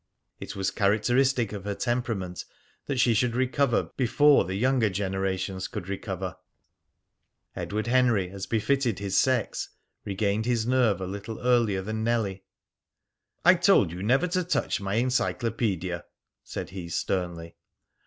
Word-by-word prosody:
It - - -7
was 95 -1 -1
characteristic 120 +3 +2
of 100 -3 -6
her 100 -1 -2
temperament 115 -8 -2 0.4
that 140 -3 -1
she 120 -1 +4
should 120 +1 +1
recover 130 0 +1
before 145 - +4
the 95 +2 -4
younger 125 0 +2
generations 95 0 -2
could 90 - -6
recover. 95 -2 -4 1.2
Edward 105 +1 -3
Henry, 120 -7 +2
as 100 -1 -6
befitted 120 0 +1
his 100 -1 -3
sex, 130 -2 +1 0.3
regained 100 +2 -1
his 120 -3 +1
nerve 120 -6 +2
a - - -2
little 100 +4 -6
earlier 115 -6 +2
than 110 +2 -3
Nellie. 110 -5 0 1.0
"I 180 - +9
told 180 - +4
you 90 +2 -6
never 125 - +3
to 180 +1 0
touch 175 - -1
my 100 +1 -2
encyclopedia," 110 -7 -1 0.4
said - - -6
he 90 -3 -7
sternly. 85 -2 -3
110 Hz, 135 wpm, -27 LUFS, 95-125 Hz, 1.2 s, I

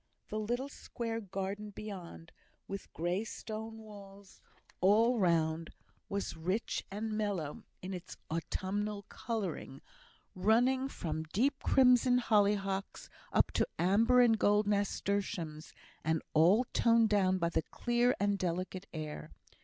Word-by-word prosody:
The 215 - -2
little 240 +5 -2
square 230 -4 -5
garden 195 +1 -4
beyond, 190 -6 -8 0.4
with 195 -1 -7
grey 175 +5 -1
stone 220 0 -6
walls 200 -2 -13 0.4
all 225 +6 +4
round, 165 -3 +1 0.4
was 200 -3 -3
rich 185 +8 -2
and 215 +3 -4
mellow 205 -8 -2 0.2
in 190 +1 -4
its 180 -2 -8
autumnal 200 +5 -3
colouring, 195 - -4 0.5
running 245 +7 +3
from 160 - -4
deep 265 - 0
crimson 250 -1 +5
hollyhocks 200 -4 +1 0.2
up - - +3
to - - +1
amber 230 +7 +4
and 225 -3 +4
gold 210 +1 +4
nasturtiums, 200 -6 -1 0.3
and 160 0 0
all 180 +10 +5
toned 230 -1 +4
down 190 -3 +3
by 170 -2 +1
the 170 - +1
clear 240 +6 +1
and 205 0 +1
delicate 185 +2 -3
air. 155 -2 -6
200 Hz, 120 wpm, -33 LUFS, 180-225 Hz, 0.5 s, crimson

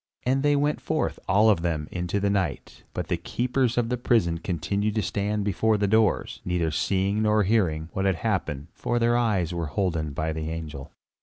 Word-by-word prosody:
And 130 +2 +1
they 145 0 +3
went 145 +1 +1
forth, 155 0 -1
all 100 +3 +4
of 105 -6 +4
them, 80 -3 -1
into 90 +2 -2
the 100 0 +1
night; 95 -3 -2
but - - -4
the - - 0
keepers 125 0 -1
of 120 -1 +1
the 125 - 0
prison 110 -9 +2
continued 100 +5 -1
to 110 - +1
stand 105 +1 -1
before 105 +2 +2
the 100 - +1
doors, 110 +1 +1
neither 85 -3 0
seeing 95 +6 0
nor 105 0 +3
hearing 90 -7 +1
what 95 - -1
had 95 -2 +3
happened, 80 -7 -2
for 120 - -2
their 120 0 +3
eyes 100 -8 +1
were 85 -2 -2
holden 80 -2 -1
by 80 +3 -2
the 80 0 -4
angel. 80 -4 -6
100 Hz, 200 wpm, -26 LUFS, 85-110 Hz, -, all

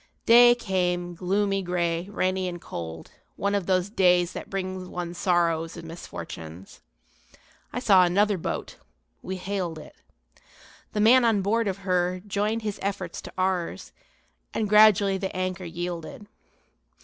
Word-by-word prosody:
Day 240 +1 +8
came, 180 -5 -1
gloomy 195 +3 0
gray, 175 0 -1
rainy 185 -2 -1
and 175 -1 -5
cold, 80 - -8 0.2
one 200 0 -1
of 200 -3 -1
those 185 +1 +1
days 180 -4 +3
that - - -7
bring 185 -1 -4
one 175 -1 -5
sorrows 170 -2 0
and 165 -1 -9
misfortunes. 90 - -9 0.9
I - - -3
saw 195 -6 +6
another 200 +2 +2
boat. - - -4 0.4
We 190 - -5
hailed 185 -3 -3
it. 155 - -12 1.0
The 210 - 0
man 245 +4 +6
on 220 -4 +2
board 225 +3 +1
of 195 0 -4
her 180 -1 +1
joined 210 +2 -1
his 210 -1 -4
efforts 195 -3 -4
to - - -11
ours, 180 - -2 0.6
and 215 - 0
gradually 205 -2 +5
the 190 -1 -4
anchor 185 0 -3
yielded. 175 +2 -6
185 Hz, 140 wpm, -26 LUFS, 175-200 Hz, 1.0 s, Day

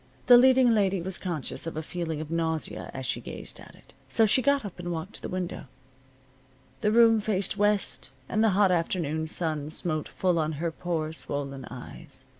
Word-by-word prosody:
The 245 - +9
leading 255 0 +6
lady 195 -3 +2
was 185 +2 -4
conscious 165 -3 -3
of 165 - -5
a 160 - -3
feeling 165 -2 -4
of 155 0 -7
nausea 160 -1 -2
as 130 0 -6
she - - -2
gazed - - -9
at - - -14
it. - - -20 0.2
So 225 - +4
she 220 +5 +4
got 280 -1 +2
up 190 -3 -8
and 175 0 -4
walked 170 +4 -5
to - - -7
the - - -5
window. 180 -1 -4 1.1
The 210 - +1
room 225 0 +6
faced 200 -3 -1
west, 205 -7 0 0.2
and 215 - +1
the 225 - +5
hot 200 -2 +5
afternoon 165 -2 0
sun 155 -3 -2
smote 155 -1 -1
full 180 -3 0
on 155 0 0
her 165 +3 -2
poor 160 -2 -3
swollen 140 -4 -4
eyes. - - -10
175 Hz, 195 wpm, -27 LUFS, 160-210 Hz, 1.1 s, The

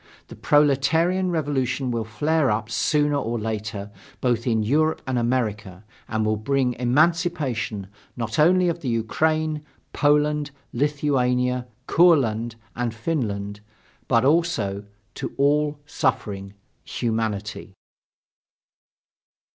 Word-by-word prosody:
The - - -9
proletarian 160 +6 +2
revolution 135 -5 -1
will 115 -2 -2
flare 150 +5 +1
up, 105 +1 -1
sooner 145 +5 +2
or 120 -3 -2
later, 105 -1 -4 0.3
both 120 -1 0
in 110 -2 +2
Europe 155 +8 +1
and 130 -2 0
America, 105 -6 -2 0.2
and 110 -1 -1
will 110 0 +1
bring 130 +3 0
emancipation 140 - +1 0.3
not 115 +1 -3
only 180 +4 +5
to 170 - +2
the 155 -6 -5
Ukraine, 155 +7 0 0.3
Poland, 150 0 +2 0.2
Lithuania, 125 -3 +1 0.2
Courland, 120 -11 +3 0.2
and 120 -1 -2
Finland, 105 -7 -2 0.5
but 115 0 +3
also 125 -11 +1 0.3
to - - -6
all 145 +1 +2
suffering 100 -7 -2 0.3
humanity. 110 -3 -3
125 Hz, 105 wpm, -24 LUFS, 110-150 Hz, 0.5 s, only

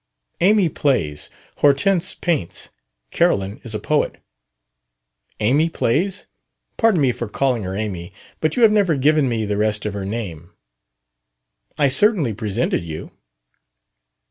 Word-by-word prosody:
"Amy 200 0 +4
plays. 125 - -1 0.3
Hortense 150 +6 +2
paints. 160 - -3 0.4
Carolyn 100 +2 0
is 110 -3 -5
a - - -2
poet." 150 +8 0 1.2
"Amy 140 +10 +2
plays? 180 - -1 0.5
Pardon 225 -6 +3
me 135 -4 +3
for 120 -2 -5
calling 125 +1 0
her 95 -1 -4
Amy, 95 -4 -4 0.3
but 155 -1 0
you 245 - +2
have 220 - +7
never 200 -6 +2
given 145 0 +2
me 115 -2 -1
the 105 0 -2
rest 105 0 0
of 105 - -2
her 100 -1 -4
name." 95 -5 -6 1.2
"I 145 - +4
certainly 175 - +2
presented 105 -4 -1
you." 80 -1 -7
125 Hz, 130 wpm, -20 LUFS, 105-160 Hz, 1.2 s, have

